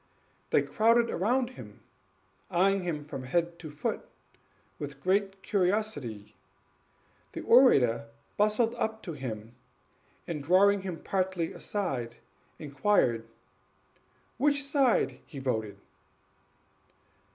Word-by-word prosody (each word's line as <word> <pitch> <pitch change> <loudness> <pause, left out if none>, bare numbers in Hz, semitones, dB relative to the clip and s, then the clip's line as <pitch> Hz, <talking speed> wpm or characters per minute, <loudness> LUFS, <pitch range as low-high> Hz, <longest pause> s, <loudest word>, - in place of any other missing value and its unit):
They - - +3
crowded 230 +1 +3
round 245 +7 +1
him, 105 - -12 0.7
eying 195 +2 +3
him 160 -5 -3
from 135 -3 -7
head 170 +5 -1
to 160 - -8
foot 150 0 -3 0.8
with 145 -1 -6
great 195 +3 0
curiosity. 180 - -1 1.0
The - - -5
orator 125 - +5 0.3
bustled 215 +3 +2
up 220 0 -2
to 170 - -5
him, 115 -5 -6 0.7
and, 160 -4 -3
drawing 195 +6 +4
him 185 -3 -6
partly 185 -3 -1
aside, 130 - -3 0.4
inquired 140 - +1
"on - - -25 1.1
which 285 +1 +2
side 255 - +2
he 145 - -10
voted?" 110 -6 -2
175 Hz, 105 wpm, -29 LUFS, 135-210 Hz, 1.1 s, orator